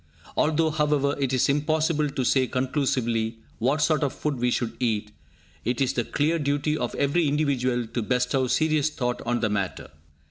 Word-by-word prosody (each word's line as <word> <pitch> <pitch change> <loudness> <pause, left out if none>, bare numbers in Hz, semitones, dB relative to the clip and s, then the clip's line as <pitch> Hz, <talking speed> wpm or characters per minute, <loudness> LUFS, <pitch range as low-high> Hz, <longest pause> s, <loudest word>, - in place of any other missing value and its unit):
Although, 160 +1 +2
however, 150 -2 +1
it 135 -2 0
is 130 -2 +2
impossible 155 +1 +1
to 135 - -2
say 130 +1 +3
conclusively 125 -4 -1 0.2
what 140 +6 +1
sort 155 -2 +2
of 140 -3 0
food 150 -3 -2
we 125 +1 +2
should 120 -1 -1
eat, 110 -3 -1 0.5
it 120 +1 -1
is 135 -2 +1
the 120 - 0
clear 155 +7 0
duty 145 +1 0
of 120 -5 -3
every 145 +3 +2
individual 130 -5 0
to 115 +2 -3
bestow 125 +3 +1
serious 155 +3 +2
thought 125 -5 -2
on 120 0 0
the 110 - +1
matter. 100 -3 -3
135 Hz, 175 wpm, -25 LUFS, 120-150 Hz, 0.5 s, say